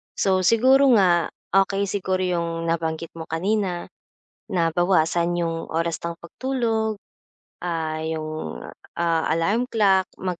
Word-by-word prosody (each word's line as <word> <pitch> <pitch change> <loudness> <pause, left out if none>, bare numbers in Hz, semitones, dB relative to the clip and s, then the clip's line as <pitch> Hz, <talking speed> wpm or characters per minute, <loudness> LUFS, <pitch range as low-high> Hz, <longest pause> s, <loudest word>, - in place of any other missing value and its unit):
So 190 -1 +2
siguro 260 +7 +5
nga, 175 -4 +3 0.2
okey 195 +1 +2
siguro 190 -1 -1
'yong 170 -2 -2
nabanggit 165 0 -2
mo 165 - -6
kanina 185 +1 -1 0.6
na 170 -4 +1
bawasan 175 -1 +2
'yong 165 -1 -2
oras 165 +1 -1
ng 170 0 -4
pagtulog, 220 +3 -2 0.7
ah, 160 -2 -2
'yong, 155 - -4 0.4
ah, 165 -1 +1
alarm 200 +10 +1
clock, 195 -4 +3
mag 180 -2 -3
175 Hz, 120 wpm, -23 LUFS, 165-195 Hz, 0.7 s, siguro